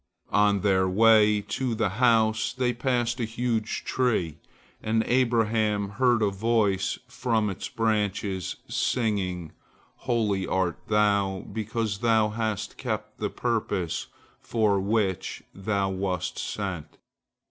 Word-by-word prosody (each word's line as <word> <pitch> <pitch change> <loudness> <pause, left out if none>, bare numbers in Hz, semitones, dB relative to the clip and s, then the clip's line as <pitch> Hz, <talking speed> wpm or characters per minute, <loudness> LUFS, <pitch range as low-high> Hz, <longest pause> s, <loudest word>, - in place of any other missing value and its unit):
On 105 -1 +3
their 95 -2 +2
way 105 +1 +5
to 125 +3 -2
the 110 -2 +1
house 110 -2 +3
they 125 -1 0
passed 120 0 0
a - - 0
huge 115 0 -2
tree, 110 - 0 0.4
and 110 +1 +1
Abraham 110 -4 +1
heard 120 +2 +2
a 100 - +2
voice 100 -2 +1
from 115 -4 0
its 95 - -6
branches, 105 -5 -1
singing, 95 -8 -1 0.5
"Holy 110 -6 0
art 90 -4 0
thou, 100 -3 +2
because 110 -1 -2
thou 110 -2 +3
hast 110 -2 -3
kept - - -4
the - - -1
purpose 105 -8 -2 0.3
for 105 -4 +1
which 95 -2 -1
thou 100 0 -1
wast 95 -2 -2
sent." 90 -7 -4
105 Hz, 115 wpm, -26 LUFS, 100-115 Hz, 0.5 s, way